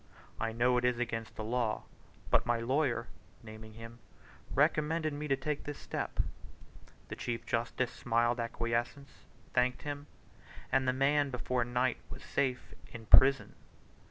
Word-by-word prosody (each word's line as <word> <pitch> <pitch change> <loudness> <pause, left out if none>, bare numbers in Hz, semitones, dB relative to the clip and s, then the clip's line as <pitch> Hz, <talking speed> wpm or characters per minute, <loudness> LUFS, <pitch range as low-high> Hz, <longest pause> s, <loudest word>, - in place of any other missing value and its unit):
I 115 - -1
know 125 +2 +3
it - - -6
is 125 -1 +2
against 115 -2 -3
the 110 - -5
law, 115 0 -1 0.5
but - - +5
my 120 -1 +1
lawyer 120 -1 +1 0.4
(naming 110 0 -10
him) 115 +1 -10 0.6
recommended 155 +2 +2
me 150 +1 -4
to 135 - +3
take 145 +2 -3
this 145 -1 -5
step." - - -3 0.9
The - - -4
Chief 120 -1 -4
Justice 120 +1 -1
smiled 120 0 +1
acquiescence, 120 +4 -2 0.4
thanked 125 0 +1
him, 145 0 -5 0.6
and 130 0 +2
the - - +5
man 140 +2 +2
before 125 -1 -1
night 125 +1 0
was - - -9
safe 130 -2 -1 0.2
in 115 -1 -9
prison. 135 +5 +6
125 Hz, 145 wpm, -32 LUFS, 115-140 Hz, 0.9 s, prison